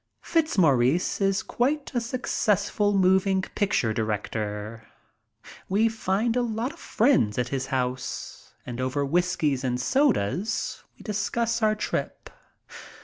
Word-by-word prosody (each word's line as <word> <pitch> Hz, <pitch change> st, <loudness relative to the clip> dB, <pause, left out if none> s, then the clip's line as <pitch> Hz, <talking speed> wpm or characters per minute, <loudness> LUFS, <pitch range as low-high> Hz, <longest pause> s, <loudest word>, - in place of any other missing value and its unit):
Fitzmaurice 170 Hz, -, +2 dB
is 195 Hz, 0 st, +2 dB
quite 280 Hz, +4 st, -1 dB
a 240 Hz, -, 0 dB
successful 210 Hz, -4 st, 0 dB
moving 190 Hz, 0 st, +3 dB
picture 190 Hz, -, +1 dB
director. 110 Hz, 0 st, -3 dB, 0.8 s
We 215 Hz, +4 st, +3 dB
find 220 Hz, +1 st, 0 dB
a 250 Hz, -, +2 dB
lot 235 Hz, +4 st, -2 dB
of 340 Hz, -, -17 dB
friends 220 Hz, -, +2 dB
at 125 Hz, -1 st, 0 dB
his 135 Hz, -1 st, -2 dB
house, 125 Hz, -1 st, -4 dB
and 120 Hz, 0 st, -5 dB
over 130 Hz, +2 st, -1 dB
whiskies 155 Hz, -4 st, 0 dB
and 125 Hz, -1 st, -1 dB
sodas 215 Hz, -, 0 dB
we -, -, -14 dB
discuss 230 Hz, +3 st, -1 dB
our 215 Hz, 0 st, +3 dB
trip. 215 Hz, -, -4 dB
190 Hz, 120 wpm, -26 LUFS, -, 0.8 s, moving